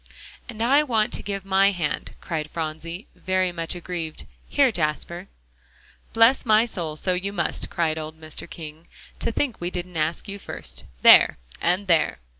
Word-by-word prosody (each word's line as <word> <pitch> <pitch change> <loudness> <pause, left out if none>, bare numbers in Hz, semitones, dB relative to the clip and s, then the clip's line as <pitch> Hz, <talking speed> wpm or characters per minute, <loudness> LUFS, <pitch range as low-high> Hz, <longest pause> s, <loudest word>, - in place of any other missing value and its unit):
"And 225 -1 -3
I 275 +5 +5
want 225 -7 +1
to - - 0
give 195 -1 -4
my 195 +1 +4
hand," 175 -7 -3
cried 155 -3 -3
Phronsie, 165 +4 -5
very 185 -1 0
much 165 0 -3
aggrieved. 170 -3 -5 0.2
"Here, 275 -3 +4
Jasper." 170 +1 -2 0.8
"Bless 230 +4 +5
my 220 -1 +5
soul, 170 -9 -4
so 185 +4 0
you 190 +2 -2
must!" 200 - -1
cried 160 -2 0
old 155 0 -7
Mr. 155 -1 -7
King; 160 0 -9 0.3
"to - - -1
think 245 -3 -2
we 175 - -1
didn't 180 -1 -5
ask 155 +5 -1
you 200 0 -6
first. - - -8 0.2
There - - +8 0.2
and 180 +4 +1
there!" 170 -4 +3
180 Hz, 165 wpm, -24 LUFS, 160-200 Hz, 0.8 s, There